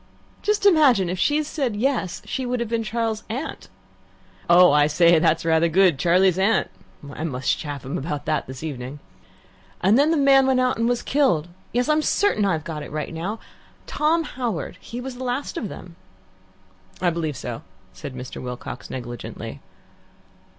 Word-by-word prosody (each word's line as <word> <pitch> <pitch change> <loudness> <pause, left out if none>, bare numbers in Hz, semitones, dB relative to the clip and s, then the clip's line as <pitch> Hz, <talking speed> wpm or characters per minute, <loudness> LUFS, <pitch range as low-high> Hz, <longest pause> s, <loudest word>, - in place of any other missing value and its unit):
Just 420 -1 0
imagine, 270 - +5
if 185 - -4
she'd 300 +6 +2
said 270 -7 -2
'Yes,' 220 -5 -1
she 260 - -3
would 250 0 -2
have 235 - -2
been 230 0 0
Charles's 225 0 -2
aunt. 265 +8 -5 0.8
(Oh, 180 +1 +7
I 145 0 +4
say, 170 +2 +5
that's 160 +1 +2
rather 165 0 +3
good! 175 -4 +4
'Charlie's 180 +2 +3
Aunt'! 205 +4 +2 0.4
I - - -6
must 130 -5 0
chaff 145 -3 -6
him 140 +7 -3
about 150 0 -4
that 155 -2 -1
this 130 +2 -8
evening.) 135 -2 -5 0.8
And 200 +7 +4
the 290 - +4
man 275 -1 +5
went 260 -1 +3
out 255 -2 +1
and 230 +1 +2
was 245 -1 0
killed. 255 - +1 0.2
Yes, 245 +1 0
I'm 305 0 +3
certain 340 - +2
I've 165 -6 0
got 155 -2 -5
it 145 - -8
right 155 +2 -4
now. 180 +7 -4 0.5
Tom 325 +2 +1
Howard 235 - -4
he 235 - -8
was 250 0 -6
the 260 - -6
last 255 +3 -3
of 210 - -3
them." 175 -2 -10 1.0
"I 180 -1 +2
believe 160 -5 -3
so," - - -6 0.3
said 130 - -8
Mr. 125 0 -7
Wilcox 125 0 -7
negligently. 120 -3 -7
190 Hz, 170 wpm, -23 LUFS, 155-255 Hz, 1.0 s, Oh